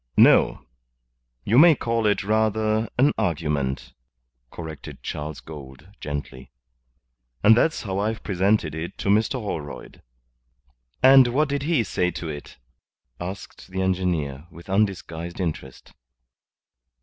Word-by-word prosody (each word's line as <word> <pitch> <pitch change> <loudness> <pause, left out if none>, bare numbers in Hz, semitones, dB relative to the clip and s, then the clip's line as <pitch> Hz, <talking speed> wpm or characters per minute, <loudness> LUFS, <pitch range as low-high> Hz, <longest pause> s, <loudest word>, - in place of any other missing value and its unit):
"No. - - +5 0.8
You 115 +5 +4
may 165 0 +8
call 115 -3 0
it 105 - +1
rather 110 +1 +1
an 140 +4 +4
argument," 70 -7 -2 0.6
corrected 80 -3 -9
Charles 75 0 -5
Gould, 70 +1 -11
gently. 70 -3 -6 0.9
"And 110 +2 +7
that's 160 +7 +1
how 95 -3 -3
I've 110 +2 -2
presented 95 -4 +1
it 80 +3 -6
to - - -3
Mr. 110 +5 +3
Holroyd." 100 - -6 1.0
"And 130 -1 +8
what 140 +5 +1
did 140 0 -1
he 150 -4 +1
say 90 -3 0
to 85 - -5
it?" 75 -2 -8 0.6
asked 95 +3 -8
the 95 0 -2
engineer, 85 -6 -1
with 85 +2 -12
undisguised 90 -4 -1
interest. 80 -7 -5
95 Hz, 120 wpm, -24 LUFS, 80-110 Hz, 1.0 s, may